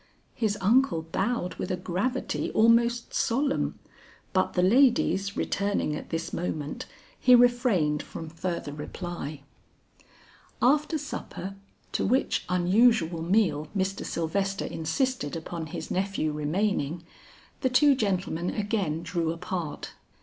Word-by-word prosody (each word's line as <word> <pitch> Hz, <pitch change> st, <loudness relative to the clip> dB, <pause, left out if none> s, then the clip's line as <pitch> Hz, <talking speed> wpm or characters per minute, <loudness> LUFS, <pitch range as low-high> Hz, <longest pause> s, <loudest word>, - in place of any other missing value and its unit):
His 215 Hz, -4 st, 0 dB
uncle 225 Hz, -4 st, +3 dB
bowed 185 Hz, +3 st, -1 dB
with -, -, -3 dB
a 185 Hz, -, 0 dB
gravity 195 Hz, +9 st, -2 dB
almost 235 Hz, +1 st, +3 dB
solemn, 275 Hz, +4 st, 0 dB, 0.6 s
but 185 Hz, -, +1 dB
the 180 Hz, -, +2 dB
ladies 200 Hz, -3 st, +3 dB
returning 200 Hz, -6 st, 0 dB
at -, -, -7 dB
this 165 Hz, 0 st, -3 dB
moment, 150 Hz, -4 st, -3 dB, 0.3 s
he 250 Hz, -, +7 dB
refrained 240 Hz, -, +3 dB
from 165 Hz, -, -8 dB
further 165 Hz, -2 st, -4 dB
reply. 150 Hz, -1 st, -6 dB, 1.2 s
After 300 Hz, +5 st, +3 dB
supper, 230 Hz, -9 st, -6 dB, 0.4 s
to -, -, 0 dB
which 255 Hz, +6 st, +1 dB
unusual 180 Hz, -1 st, +3 dB
meal 170 Hz, -4 st, +2 dB
Mr. 190 Hz, +1 st, -1 dB
Sylvester 195 Hz, +4 st, -1 dB
insisted 160 Hz, -, -1 dB
upon 165 Hz, 0 st, -5 dB
his -, -, -6 dB
nephew 190 Hz, -5 st, 0 dB
remaining, 160 Hz, +1 st, -1 dB, 0.6 s
the 260 Hz, -, +1 dB
two 280 Hz, +3 st, +5 dB
gentlemen 185 Hz, -7 st, -1 dB
again 200 Hz, -7 st, -1 dB
drew 165 Hz, -1 st, -1 dB
apart. 170 Hz, -1 st, -4 dB
190 Hz, 115 wpm, -27 LUFS, 165-235 Hz, 1.2 s, he